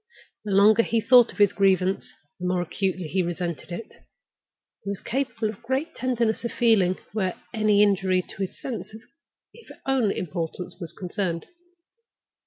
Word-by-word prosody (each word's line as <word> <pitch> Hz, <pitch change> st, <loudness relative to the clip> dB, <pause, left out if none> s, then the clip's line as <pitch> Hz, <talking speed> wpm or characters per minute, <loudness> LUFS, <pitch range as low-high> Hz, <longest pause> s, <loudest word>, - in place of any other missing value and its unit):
The 205 Hz, -, -3 dB
longer 210 Hz, +3 st, +6 dB
he 230 Hz, 0 st, +1 dB
thought 245 Hz, +1 st, +6 dB
of -, -, -16 dB
his 205 Hz, -2 st, +4 dB
grievance, 190 Hz, -1 st, +2 dB, 0.3 s
the 180 Hz, -, -2 dB
more 180 Hz, -1 st, +1 dB
acutely 185 Hz, +1 st, -2 dB
he 190 Hz, +4 st, 0 dB
resented 175 Hz, -1 st, -4 dB
it. 190 Hz, +6 st, -8 dB, 0.8 s
He 200 Hz, -, -5 dB
was 200 Hz, -, -3 dB
capable 245 Hz, -4 st, -2 dB
of 215 Hz, +1 st, -8 dB
great 265 Hz, +7 st, -2 dB
tenderness 240 Hz, -4 st, 0 dB
of 235 Hz, -, -2 dB
feeling 205 Hz, -6 st, +3 dB, 0.2 s
where 190 Hz, -4 st, -1 dB
any 215 Hz, -2 st, +4 dB
injury 190 Hz, -2 st, +2 dB
to -, -, -12 dB
his 195 Hz, -2 st, -4 dB
sense 230 Hz, -3 st, -6 dB
of 220 Hz, -, -11 dB, 0.5 s
his 470 Hz, -, -15 dB
own 265 Hz, -5 st, +2 dB
importance 175 Hz, +1 st, -4 dB
was 170 Hz, -4 st, -3 dB
concerned. 180 Hz, -2 st, -3 dB
200 Hz, 160 wpm, -25 LUFS, 185-230 Hz, 0.8 s, longer